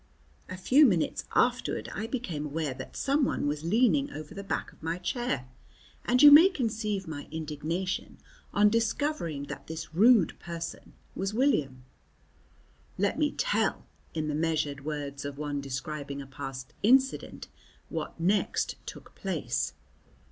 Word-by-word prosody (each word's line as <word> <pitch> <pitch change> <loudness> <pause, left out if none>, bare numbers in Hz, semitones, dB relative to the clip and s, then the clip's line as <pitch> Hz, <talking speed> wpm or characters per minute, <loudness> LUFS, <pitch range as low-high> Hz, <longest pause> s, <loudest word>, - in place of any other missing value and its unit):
A 185 - -6
few 260 +11 +5
minutes 175 -8 0
afterward 110 - +1
I 215 +2 -3
became 225 - -3
aware 150 -1 -2
that 130 0 -9
someone 280 - +1
was 145 +1 -1
leaning 250 - +3
over 155 -1 -8
the 200 0 -7
back 195 - -3
of - - -24
my 165 +2 -2
chair, 180 - -2 0.6
and 250 +3 +3
you 290 - +11
may 320 +6 +10
conceive 215 - -2
my 145 -3 -6
indignation 160 +4 -3 0.3
on 205 0 +4
discovering 230 - 0
that - - -8
this 160 0 -6
rude 215 +1 +5
person 165 -1 -7 0.2
was 195 +2 -3
William. 145 - +1 1.1
Let - - 0
me - - +2
tell, - - 0 0.3
in 155 -1 -1
the 150 - -1
measured 155 -3 -1
words 145 -2 -4
of 140 -1 -5
one 145 -1 -3
describing 140 +1 -5
a 140 - -6
past 130 -1 -7
incident, 265 +4 +2 0.4
what - - -5
next 190 +3 +1
took - - -9
place. - - -2
165 Hz, 140 wpm, -29 LUFS, 145-225 Hz, 1.1 s, you